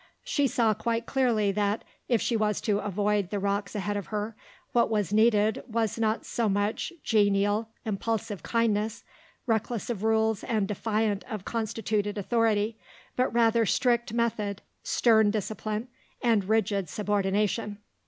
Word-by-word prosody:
She 285 -4 +1
saw 230 -3 +2
quite 230 +2 -2
clearly 235 -7 +2
that, 205 +1 0 0.3
if 235 -3 +2
she 235 - 0
was 215 -2 +1
to 205 -2 +1
avoid 205 -1 0
the 205 - -2
rocks 200 0 -1
ahead 205 0 -2
of 200 -3 -4
her, 210 +1 -3 0.4
what 235 - +3
was 210 -3 0
needed 215 -1 +3
was 225 -1 -1
not 220 0 0
so 230 -3 0
much 205 +2 -1
genial, 205 0 +2 0.2
impulsive 210 -2 -2
kindness, 225 0 0 0.4
reckless 230 0 -1
of 210 -5 -4
rules 220 -1 +2
and 215 -5 0
defiant 210 0 -1
of 210 -4 -5
constituted 215 -2 -2
authority, 220 0 +1 0.4
but 255 +1 +1
rather 230 0 +3
strict 240 +1 +2
method, 215 -4 -1 0.2
stern 220 -3 +4
discipline, 215 +2 -3 0.3
and 225 -5 +2
rigid 200 -4 +1
subordination. 205 +1 0
215 Hz, 140 wpm, -28 LUFS, 205-230 Hz, 0.4 s, stern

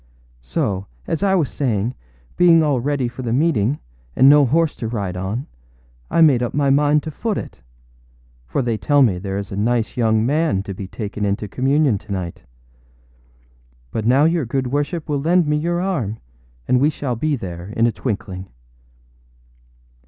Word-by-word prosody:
âSo, 95 +10 -2 0.2
as 160 - -2
I 195 -1 +3
was 165 -7 +2
saying, 120 -4 -1 0.4
being 170 -2 +5
all 145 -4 +1
ready 135 0 -1
for 120 +2 -7
the 120 -3 -3
meeting, 135 -2 +2 0.4
and 130 - +6
no 145 -1 +7
horse 160 +4 +2
to 115 - -4
ride 100 -6 -3
on, 100 +9 -3 0.6
I - - +2
made 140 -7 +5
up 120 - -2
my 140 -1 +2
mind 145 +1 +3
to 155 - -5
foot 215 +6 -2
it; - - -7 0.9
for 65 - -1
they 115 -2 -1
tell 145 -1 +4
me 95 -8 +2
there 95 +1 -4
is 100 -1 -5
a - - -4
nice 115 +2 0
young 110 -2 +2
man 145 -7 +1
to 100 - -6
be 95 0 -7
taken 105 +1 -5
into 100 +1 -1
communion 135 0 +1
to 105 - -13
night. 90 -3 -4 1.5
But 110 0 -2
now 130 +4 +5
your 165 0 +2
good 130 +2 -1
worship 145 +3 -2
will 145 -3 -1
lend 175 +3 +3
me 150 0 +1
your 170 +3 -1
arm, 150 - -2 0.5
and 125 - +3
we 145 +3 +4
shall 140 -5 -3
be 150 +5 0
there 90 -6 -7
in 115 +2 +1
a 120 - +3
twinkling. 100 -5 -4
125 Hz, 180 wpm, -20 LUFS, 105-150 Hz, 1.5 s, no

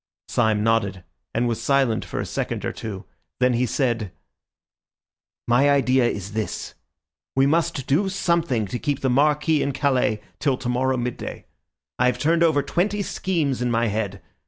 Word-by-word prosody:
Syme 110 -1 +2
nodded 100 -5 +1 0.3
and 120 +2 0
was 115 -2 -2
silent 135 -5 +2
for - - -5
a - - -2
second - - -3
or - - -1
two, 100 -3 -7 0.3
then 125 0 +3
he 125 +1 +1
said— 115 -7 -1 1.4
"My 125 +4 +4
idea 130 -3 +3
is 100 -4 -4
this. 110 -1 -3 0.6
We 135 0 +4
must 160 -2 +1
do 185 +8 +2
something 170 - +1
to 110 +5 -4
keep 145 -2 -2
the 130 - +1
Marquis 150 +3 +3
in 140 - -1
Calais 130 -7 +1 0.2
till 140 -3 +1
tomorrow 130 +1 0
midday. 120 0 -5 0.5
I 125 - +4
have 125 - +1
turned 165 +2 +2
over 155 -4 +4
twenty 200 +7 0
schemes 160 -9 -1
in 125 - +1
my 115 -1 +1
head. 100 -2 -3
130 Hz, 160 wpm, -23 LUFS, 115-145 Hz, 1.4 s, My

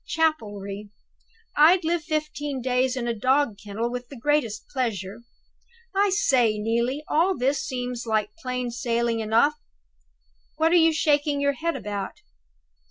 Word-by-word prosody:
Chapelry! 210 - -1 0.7
I'd 335 +5 +6
live 335 0 0
fifteen 300 -3 -3
days 255 +1 +1
in 240 -1 -2
a 235 - 0
dog 255 -1 +1
kennel 220 +3 -3
with 245 0 -5
the 275 - -10
greatest 235 -5 0
pleasure. 225 -7 -3 0.8
I 400 +1 +3
say, 250 - +3
Neelie, 235 +6 -1
all 350 +4 +2
this 270 +3 +1
seems 250 -2 -4
like 215 -1 0
plain 250 -3 -3
sailing 235 -1 0
enough. 230 +8 +2 1.0
What 320 +1 +3
are - - +5
you 330 -1 +6
shaking 295 -2 +1
your 280 0 +2
head 330 +3 -2
about? 205 -2 -4
255 Hz, 140 wpm, -25 LUFS, 230-300 Hz, 1.0 s, I'd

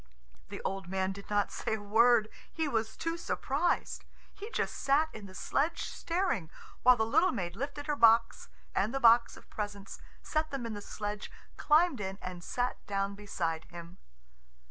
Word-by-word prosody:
The - - -7
old 195 -1 -3
man 190 +1 -1
did 200 +1 -10
not 205 -1 +1
say 220 - -2
a - - -6
word. 220 +2 +4 0.2
He 320 -2 -1
was 225 -4 -1
too 330 0 -2
surprised. 330 0 -1 0.3
He 415 +3 -8
just - - -1
sat 290 +3 +2
in 210 -2 -9
the 185 - -13
sledge 310 - 0
staring, 335 - -1 0.3
while 250 0 +7
the 220 - +2
little 325 +11 +3
maid 180 -7 -3
lifted 285 +5 -5
her 300 - 0
box 230 -2 +4 0.2
and 210 +6 0
the - - +1
box 235 -1 +5
of - - -15
presents, 205 -1 -6 0.2
set 310 0 -1
them 275 -3 -4
in 230 - -4
the 205 - -6
sledge, 205 0 -5 0.3
climbed 305 -5 +3
in, 190 -1 -4
and 180 -1 -7
sat 245 +5 -2
down 195 0 -1
beside 170 -6 -3
him. 170 +1 -11
220 Hz, 175 wpm, -31 LUFS, 195-275 Hz, 0.3 s, while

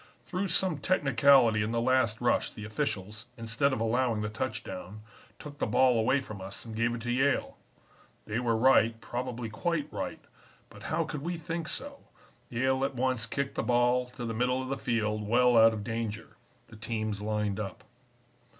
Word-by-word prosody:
"Through 185 +2 -2
some 175 -2 +1
technicality 135 -8 +4
in 110 +2 -1
the 115 - +1
last 120 -3 +2
rush 120 - +2
the 110 - -9
officials, 110 -2 -3
instead 115 +5 0
of 130 - -1
allowing 115 0 +1
the 105 - -2
touchdown, 105 -3 -5 0.4
took 145 +3 -10
the - - 0
ball 125 -3 +4
away 130 +5 +3
from 105 -7 -8
us 95 +4 -8
and 110 -1 -7
gave 115 +1 +1
it 115 - -7
to 120 +1 -2
Yale. 135 +3 +1 0.7
They 110 +2 -2
were 115 -2 +1
right, 115 -2 +4
probably 120 0 -4
quite 155 +8 -2
right, - - -4 0.5
but - - -13
how 160 +1 +1
could 150 -2 -5
we 170 +3 -3
think 165 0 -4
so? 280 +6 -5 0.5
Yale 130 +2 +1
at 135 0 -1
once 125 -2 0
kicked 140 +2 -2
the - - -1
ball 125 +1 +2
to 120 - -5
the 115 - -3
middle 125 +3 +1
of 130 0 -4
the 135 - 0
field 110 -3 -1
well 125 +2 +4
out 115 0 +7
of 110 -2 -5
danger. 115 -2 -4 0.3
The 110 - -12
teams 110 -2 -3
lined 105 -1 -1
up. 105 +4 -6
120 Hz, 185 wpm, -29 LUFS, 110-130 Hz, 0.7 s, out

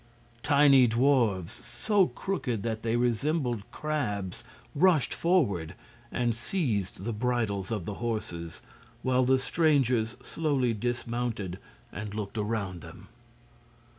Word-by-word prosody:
Tiny 140 -3 +6
dwarfs, 115 -7 +2
so 190 - +1
crooked 125 - -3
that 110 -1 -2
they 115 0 0
resembled 120 -1 0
crabs, 115 -9 -3 0.3
rushed 165 -2 +3
forward 100 - +1 0.4
and 120 -1 0
seized 115 - -2
the 115 +2 -2
bridles 105 -4 -1
of 105 -7 -3
the 105 - -4
horses, 85 -8 -4 0.4
while 130 0 +3
the 130 +1 +4
strangers 130 -6 +2
slowly 140 -7 0
dismounted 120 -4 -3 0.3
and 105 0 -6
looked 105 0 -4
around 105 -5 -2
them. 85 +3 -12
120 Hz, 110 wpm, -29 LUFS, 105-135 Hz, 0.4 s, Tiny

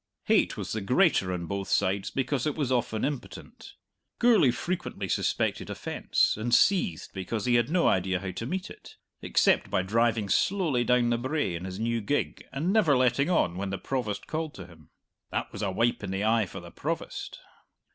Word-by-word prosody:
Hate - - +2
was - - -5
the 110 - -2
greater 125 - +3
on 90 -1 -3
both 100 +2 -4
sides 95 0 +1
because 135 +1 -1
it 150 - -1
was 140 -5 -1
often 115 -3 0
impotent. 140 -2 -7 0.4
Gourlay 230 - +5
frequently 175 +9 -3
suspected - - -1
offence, - - 0
and 120 +2 +2
seethed 180 - +2
because 95 +3 -3
he 125 - +2
had 120 +1 +3
no 175 +1 +2
idea 95 0 +1
how 95 0 -5
to 115 - -5
meet 185 +5 -4
it - - -13 0.3
except - - +2
by 95 - +1
driving 110 +1 +1
slowly 155 - +1
down 120 0 +2
the 120 - +1
brae 130 - -1
in 85 +2 -5
his 95 +1 -6
new 115 +1 0
gig 145 +8 -2
and 160 +8 -1
never 165 -11 +4
letting 130 +4 +2
on 90 - +1
when 100 +1 -3
the 95 - -3
Provost 115 -6 -3
called 160 -1 -4
to 95 - -8
him. 80 -4 -17 0.4
That - - -3
was - - -7
a 100 - 0
wipe 115 +5 0
in - - -4
the 95 +1 -2
eye 110 -2 +2
for - - -8
the - - -11
Provost! - - -4
115 Hz, 195 wpm, -28 LUFS, 95-145 Hz, 0.4 s, Gourlay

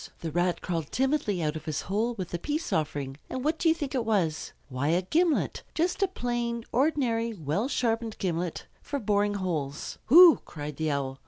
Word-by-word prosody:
The 165 - -3
Rat 175 +2 0
crawled 165 -5 -3
timidly 260 - 0
out 150 0 -1
of 155 - -7
his 155 -2 -2
hole 220 +5 -1
with 185 -5 -5
the 175 - -3
peace 300 - -2
offering; 145 -3 -2
and 260 - -4
what 315 +1 +1
do 335 - +3
you 320 - +4
think 290 -5 -4
it 255 -3 0
was? 190 -8 0 0.2
Why, 130 +1 -2
a 170 +4 +2
gimlet! 325 - +1
Just 350 +5 0
a 390 - +4
plain, 240 -7 -2
ordinary, 240 -4 +1
well 165 - -1
sharpened 230 -4 -1
gimlet 175 -2 -2 0.2
for 285 - -3
boring 205 -3 +1
holes. 160 -7 -3
"Hoo!" 340 +5 +9
cried 150 -2 -7
the 160 -1 0
Owl. 135 -2 -2
205 Hz, 190 wpm, -28 LUFS, 160-260 Hz, 0.2 s, Hoo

